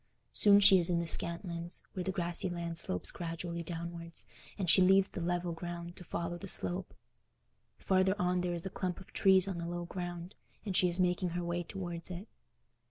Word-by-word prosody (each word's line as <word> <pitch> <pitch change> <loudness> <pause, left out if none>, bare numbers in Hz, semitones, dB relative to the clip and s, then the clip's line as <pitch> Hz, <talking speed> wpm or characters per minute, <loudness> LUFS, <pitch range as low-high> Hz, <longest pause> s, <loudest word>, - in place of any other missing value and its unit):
Soon 205 -1 +7
she 195 -2 +8
is 170 - +2
in 175 - +2
the 170 - -1
Scantlands, 170 +1 -1
where 185 - -3
the 190 - -1
grassy 175 -1 -1
land 170 -1 -3
slopes 90 - 0
gradually 170 0 -5
downwards, 170 0 -5 0.3
and 190 -3 -2
she 180 +3 +6
leaves 190 +1 +5
the 180 - -5
level 175 0 -1
ground 175 +1 -6
to 180 - -5
follow 170 0 -4
the 195 - -7
slope. 180 0 0 0.8
Farther 190 0 +2
on 180 -1 +1
there 175 -1 -1
is 170 - -2
a 190 - -4
clump 180 -2 -3
of 190 - -15
trees 190 -1 +5
on 185 -3 -3
the 170 - -4
low 175 0 -4
ground, 175 0 -6 0.3
and 195 -3 -3
she 180 - +4
is 175 +2 -2
making 180 0 +1
her 175 - -2
way 170 0 -2
towards 175 -1 -6
it. 185 +4 -7
175 Hz, 200 wpm, -32 LUFS, 170-185 Hz, 0.8 s, she